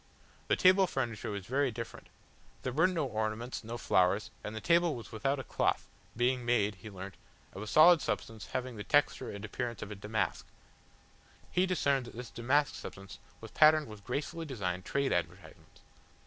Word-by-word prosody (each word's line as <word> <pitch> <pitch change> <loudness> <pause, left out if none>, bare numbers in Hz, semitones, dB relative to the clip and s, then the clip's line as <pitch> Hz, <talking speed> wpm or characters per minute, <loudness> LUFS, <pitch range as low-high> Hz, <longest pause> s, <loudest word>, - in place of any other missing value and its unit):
The - - +3
table 185 +1 +5
furniture 120 - -3
was 100 -2 -5
very 135 +4 +1
different. 115 0 -7 0.6
There 130 - -2
were 160 +6 +4
no 170 -5 -1
ornaments, 110 +1 -3
no 115 +2 -5
flowers, 95 0 +2
and 105 - -5
the - - -3
table 170 +3 +3
was 115 - -9
without 135 +6 0
a - - -4
cloth, - - 0 0.3
being 125 +1 +1
made, 110 -4 +2
he 110 - -8
learnt, 95 -1 -8 0.4
of 95 - -7
a 105 - -6
solid 160 +5 +7
substance 110 -5 -4
having 130 -2 -4
the 105 - -5
texture 145 -1 +2
and 100 +1 -6
appearance 120 +1 -4
of 105 -1 -8
damask. 110 +1 -2 1.0
He 180 +1 +2
discerned 140 -8 +1
that - - -11
this 125 +1 -7
damask 135 +5 +1
substance 95 0 -9 0.2
was - - -9
patterned 155 0 +6
with 105 -4 -11
gracefully 160 +7 -4
designed 95 -8 -3
trade 140 -1 0
advertisements. 90 -1 -5
120 Hz, 175 wpm, -32 LUFS, 105-145 Hz, 1.0 s, solid